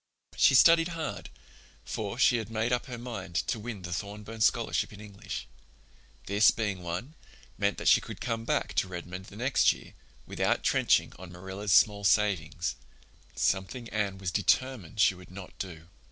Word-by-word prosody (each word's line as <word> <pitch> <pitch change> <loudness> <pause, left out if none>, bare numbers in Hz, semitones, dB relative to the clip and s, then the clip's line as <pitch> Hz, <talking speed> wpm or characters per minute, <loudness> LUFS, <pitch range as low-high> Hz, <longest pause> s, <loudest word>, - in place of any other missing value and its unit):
She 135 - +5
studied 165 +4 +7
hard, 160 - -5 0.6
for 105 +1 -4
she 125 -1 +4
had 110 -2 -5
made 115 +2 0
up 125 - -1
her 125 -2 -6
mind 115 -7 -7
to 115 - -2
win 105 -3 -7
the 90 0 -4
Thorburn 105 +4 -6
Scholarship - - +2
in 105 - -12
English. 105 -2 -7 0.8
This 100 +1 +5
being 105 -4 -2
won, 90 - -5 0.4
meant - - 0
that - - -3
she - - +6
could - - -9
come 115 -1 -2
back - - -1
to - - +2
Redmond 90 +1 -7
the 100 - -13
next 125 +5 +3
year - - -10 0.3
without - - 0
trenching - - +2
on 95 -1 -10
Marilla's 95 +3 -5
small 105 -2 +5
savings—something 95 +3 -1
Anne 100 -3 -1
was 95 -2 -3
determined 105 - 0
she 100 - +5
would 90 0 -14
not 95 0 -10
do. 85 -4 -7
100 Hz, 165 wpm, -29 LUFS, 95-115 Hz, 0.8 s, studied